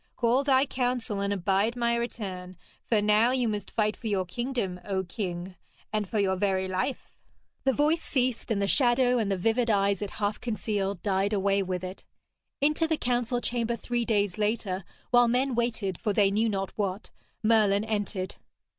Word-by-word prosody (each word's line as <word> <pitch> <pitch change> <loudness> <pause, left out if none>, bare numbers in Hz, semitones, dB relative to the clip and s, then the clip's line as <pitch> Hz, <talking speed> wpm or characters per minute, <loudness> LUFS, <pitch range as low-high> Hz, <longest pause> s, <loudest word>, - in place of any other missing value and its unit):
Call 245 +3 +2
thy 270 -1 +4
council, 245 -6 -1
and 200 0 0
abide 200 +4 +1
my 235 -1 +1
return, 190 -6 -4 0.3
for 215 -3 +2
now 210 +3 +4
you 255 -2 +1
must 210 -2 -3
fight 215 -1 0
for 225 - -7
your 195 -3 0
kingdom, 235 -3 -3
O 190 -2 -1
king, 180 -1 -5 0.4
and 210 -3 -1
for 220 - -2
your 195 -2 +2
very 190 -1 0
life.' 185 +8 -3 0.5
The 265 - +4
voice 305 +5 +2
ceased, 255 -4 -1
and 220 -3 +1
the 200 - +1
shadow 250 0 +3
and 205 -3 0
the 195 - +1
vivid 225 +5 +1
eyes 200 -2 +2
it 205 - -3
half 205 0 -1
concealed 205 -5 -2
died 200 0 +1
away 200 0 +2
with 185 -1 -3
it. 185 +1 -7 0.6
Into 300 +3 +2
the 320 -1 +1
council 245 -1 0
chamber 235 -1 -1
three 240 +2 -2
days 205 -4 0
later, 205 -3 -1 0.3
while 245 -1 +6
men 255 +3 +1
waited 225 -6 -1
for 210 - 0
they 200 -1 +3
knew 220 +3 +2
not 195 -2 -2
what, 200 -1 -3 0.3
Merlin 215 -2 +4
entered. 205 -3 -2
215 Hz, 180 wpm, -28 LUFS, 195-240 Hz, 0.6 s, while